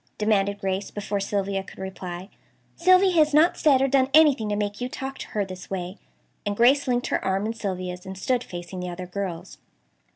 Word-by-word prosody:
demanded 200 -1 +1
Grace, 195 0 -2
before 205 0 -3
Sylvia 195 -1 -1
could - - -14
reply. 190 -1 -6 0.5
"Sylvia 370 +2 +5
has 305 -4 +3
not 320 +4 +5
said 270 -4 +4
or - - +3
done 265 -1 +3
anything 285 -9 +5
to 205 - 0
make 205 +1 -3
you 250 - -2
talk 270 +1 -6
to - - -6
her 205 -2 -2
this 185 -1 -9
way," 185 0 -5 0.4
and 205 0 -3
Grace 265 +4 +4
linked 245 -1 +1
her - - -1
arm 195 +2 0
in 225 - -2
Sylvia's, 185 -4 -4
and 190 0 -8
stood 250 +5 0
facing 175 -1 -7
the 180 0 -4
other 180 +1 -6
girls. 180 -1 -6
205 Hz, 200 wpm, -25 LUFS, 190-260 Hz, 0.5 s, Sylvia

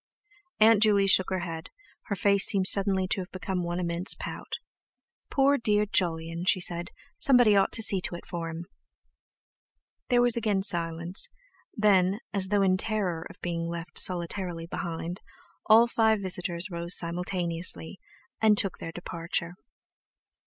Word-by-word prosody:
Aunt 220 -1 +5
Juley 205 -2 +4
shook 190 -1 +5
her 185 -2 -2
head; 165 -2 -7 0.4
her 200 - -3
face 200 0 +5
seemed 195 -2 +2
suddenly 190 -1 +3
to 195 - -1
have 180 - -9
become 185 0 -4
one 175 +1 -4
immense 170 +1 0
pout. - - -8 0.8
"Poor 280 +1 +2
dear 210 -2 +1
Jolyon," 165 -3 -1
she 185 - +3
said, 175 -1 -1 0.3
"somebody 245 -6 +5
ought 195 -1 +2
to 225 - +4
see 195 -3 +3
to 175 - -5
it 175 - -11
for 170 -2 -6
him!" 165 +1 -7 1.4
There 245 -1 +3
was 245 -1 +4
again 210 -4 -1
silence; 170 0 -1 0.5
then, 200 -3 +2
as 195 -2 +1
though 200 0 +1
in 185 -1 +2
terror 185 -6 -3
of - - -15
being 170 -1 -4
left 170 0 -5
solitarily 175 -1 -1
behind, 170 +1 -6 0.5
all 225 +2 +6
five 220 -2 +1
visitors 180 0 -3
rose 170 +1 0
simultaneously, 170 0 -1 0.4
and 215 -2 +4
took 195 -3 0
their 165 - -7
departure. 170 0 -5
185 Hz, 150 wpm, -27 LUFS, 170-205 Hz, 1.4 s, all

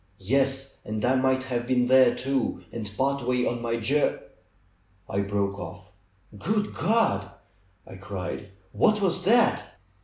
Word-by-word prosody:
^^Yes! 135 +5 0
And 110 +1 -3
I 125 - +3
might 130 0 +2
have 120 -2 -3
been 125 -1 +2
there, 130 -1 +5
too, 135 +1 -1
and 110 -3 -6
part 140 +1 +1
way 125 0 0
on 120 0 -2
my 115 -1 -1
jour 135 +6 +1 0.4
" 95 0 -38
I 100 - -2
broke 100 0 -1
off. 90 +3 -9 0.4
^^Good 210 - -1
God!" 150 - +1 0.6
I 95 - -11
cried. 100 +1 -6 0.3
^'What 215 -1 +3
was 190 -2 +1
that!" 235 +4 +3
125 Hz, 150 wpm, -26 LUFS, 100-135 Hz, 0.6 s, there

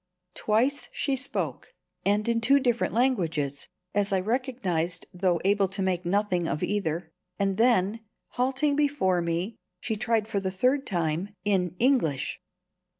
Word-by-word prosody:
Twice 235 +10 +1
she 275 - 0
spoke, 275 - -3 0.3
and 205 +2 +1
in 230 -1 +1
two 275 +5 +5
different 240 -4 0
languages 165 - 0 0.3
(as 200 -1 +1
I 190 - +3
recognized, 190 -7 -1
though 180 -1 +1
able 200 0 +3
to 195 +1 -3
make 180 -2 -1
nothing 185 -3 +1
of 150 - -2
either), 170 -5 -1 0.3
and 195 -1 0
then, 225 -3 +3 0.3
halting 270 +3 +1
before 280 -12 +2
me, 170 +6 -2 0.2
she 225 +1 -2
tried 220 0 0
for 205 - -1
the 190 -1 -2
third 255 +9 +1
time 175 +2 -1
in 185 -4 +1
English. 230 - +1
205 Hz, 145 wpm, -27 LUFS, 180-245 Hz, 0.3 s, two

